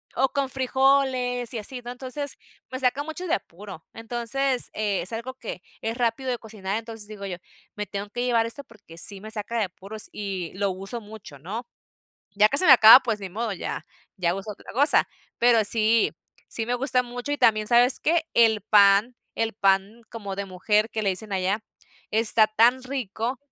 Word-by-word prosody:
O 265 +2 +2
con 275 -2 -2
frijoles 260 -2 +1
y - - -3
así, 245 +4 -6
¿no? 240 - -6
Entonces, 265 +3 -5 0.3
me 260 - -4
saca 265 +2 0
mucho 320 +4 -6
de - - 0
apuro. 190 -2 -10
Entonces, 240 +3 -2
eh, 210 -3 -1
es 185 - -3
algo 240 +3 -5
que 220 -7 -8 0.2
es 225 +2 -3
rápido 245 +2 -1
de 245 - -1
cocinar, 210 -2 -5
entonces 225 -2 -7
digo 205 -2 -8
yo: 180 -3 -5 0.4
"Me 210 0 -4
tengo 200 0 -6
que 245 +3 -4
llevar 235 -2 +2
esto 235 +5 -6
porque 205 -9 -17
sí 195 +3 0
me 215 +1 -9
saca 220 +2 -4
de 215 - +1
apuros 195 +4 -6
y 195 -4 -5
lo 200 -1 0
uso 195 +6 -7
mucho", 205 -10 -12
¿no? 220 - -6 0.7
Ya 210 +1 +5
que 275 - +1
se 365 - +7
me 275 - +9
acaba, 230 +1 +10
pues, 225 -4 -2
ni 195 - -7
modo, 220 +2 -3
ya 190 - -5 0.3
ya 175 -1 0
uso 195 +2 -6
otra - - -13
cosa. 285 +5 +5 0.3
Pero 235 -3 +4
sí, 225 +1 +3 0.4
sí 225 -1 -4
me 245 - 0
gusta 250 0 +1
mucho 245 +3 -6
y 290 - -2
también, 215 -1 +3
¿sabes 245 +2 +4
qué? 330 0 +1
El 220 -2 +4
pan. 205 +4 +4 0.2
El 225 0 -1
pan 195 +2 +1
como 200 -4 -6
de 200 - -3
mujer 210 +4 0
que 220 - -3
le 195 - +1
dicen 200 +2 +1
allá, 190 +3 -1 0.5
está 220 0 +3
tan 235 +4 +3
rico. 250 -1 -4
225 Hz, 195 wpm, -25 LUFS, 205-250 Hz, 0.7 s, acaba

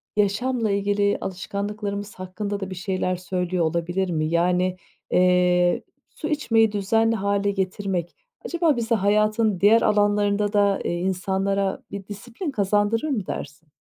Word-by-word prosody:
yaşamla 215 +2 +1
ilgili 200 0 +1
alışkanlıklarımız 200 +2 -4
hakkında 200 +2 -4
da 195 -1 -5
bir 185 - -6
şeyler 185 0 -1
söylüyor 180 -1 -1
olabilir 175 +3 -1
mi? 155 -2 0
Yani, 180 +2 +1 0.3
eee, 180 -1 +3 0.3
su 310 - -4
içmeyi 225 -8 +2
düzenli 225 +3 +1
hâle 200 -1 0
getirmek, 190 -2 -2 0.3
acaba 335 -4 +1
bize 235 -1 0
hayatın 215 0 +2
diğer 220 +3 +6
alanlarında 205 0 +2
da, 200 -1 +3
eee, - - -1
insanlara 190 +1 -1
bir 200 -1 -7
disiplin 235 - -6
kazandırır 205 +4 +1
mı 220 -9 -1
dersin? 150 +2 -7
200 Hz, 130 wpm, -24 LUFS, 185-210 Hz, 0.3 s, diğer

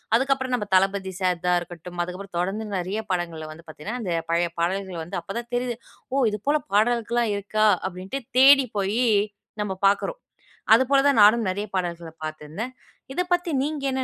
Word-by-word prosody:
அதுக்கப்புறம் 265 +1 +1
நம்ம 215 -4 -3
தளபதி 195 0 +2
சார் 180 -2 0
தான் 180 0 +4
இருக்கட்டும், 175 0 -10
அதுக்கப்புறம் 180 +2 -8
தொடர்ந்து 195 +5 -2
நெறைய 185 +4 -2
படங்கள்ல 165 -3 -3
வந்து 165 +2 -15
பார்த்தீங்கன்னா, 205 +11 -6
அந்த 185 - -3 0.2
பழைய 170 +1 +2
பாடல்கள் 185 0 -1
வந்து 175 +3 -4
அப்ப 195 - -7
தான் 235 0 -9
தெரியுது. 245 -1 -1 0.4
"ஓ 275 - +2
இது 210 - -3
போல 300 +1 +3 0.2
பாடல்கள்லாம் 235 +1 +2
இருக்கா?"அப்படின்ட்டு 200 +2 0 0.2
தேடி 270 0 +7
போயி 200 +5 +1 0.6
நம்ம 205 -2 -2
பார்க்குறோம். 205 - 0 0.5
அது 230 +4 +6
போல 275 - +6
தான் 280 -5 +4
நானும் 220 +1 +5
நெறைய 205 +3 -3
பாடல்கள 170 -2 -3
பார்த்திருந்தேன். 155 +10 -6 0.4
இத 360 - 0
பத்தி 350 -1 0
நீங்க 295 0 -2
என்ன 260 0 -1
200 Hz, 165 wpm, -24 LUFS, 180-240 Hz, 0.6 s, தேடி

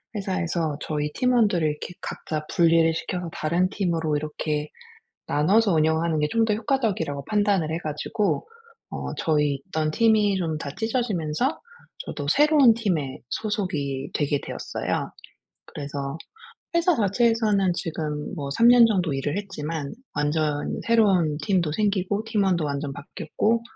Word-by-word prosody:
회사에서 175 -6 -1
저희 150 -1 -2
팀원들을 220 -10 +2
이렇게 150 +3 -4
각자 155 -1 -4
분리를 165 -1 +4
시켜서 175 +1 -4
다른 170 +4 +1
팀으로 165 -6 0
이렇게 150 0 -3 0.6
나눠서 195 +8 +3
운영하는 160 +1 +2
게 150 - +1
좀 230 0 +2
더 215 - +1
효과적이라고 215 - -1
판단을 205 -6 +1
해 165 - -1
가지고 175 - -2 0.4
어 - - -5
저희 150 -3 +1
있던 155 -1 -1
팀이 215 -1 +3
좀 165 -4 -2
다 140 - -5
찢어지면서 225 - -1 0.5
저도 145 -2 -5
새로운 290 - +5
팀에 170 - -2
소속이 150 -11 -2
되게 145 -1 0
되었어요. - - -3 0.6
그래서 140 +1 -5 0.6
회사 340 +1 +3
자체에서는 215 -3 +2
지금 155 +1 -4
뭐 140 -2 -4
3 230 +12 +4
년 240 -1 +8
정도 180 -8 0
일을 145 +5 -2
했지만 160 -7 -4 0.2
완전히 150 0 -1
새로운 195 -10 +3
팀도 170 -4 +1
생기고 200 +1 0
팀원도 195 -7 +1
완전 140 0 -3
바뀌었고 220 +10 -1
170 Hz, 310 characters per minute, -24 LUFS, 150-210 Hz, 0.6 s, 년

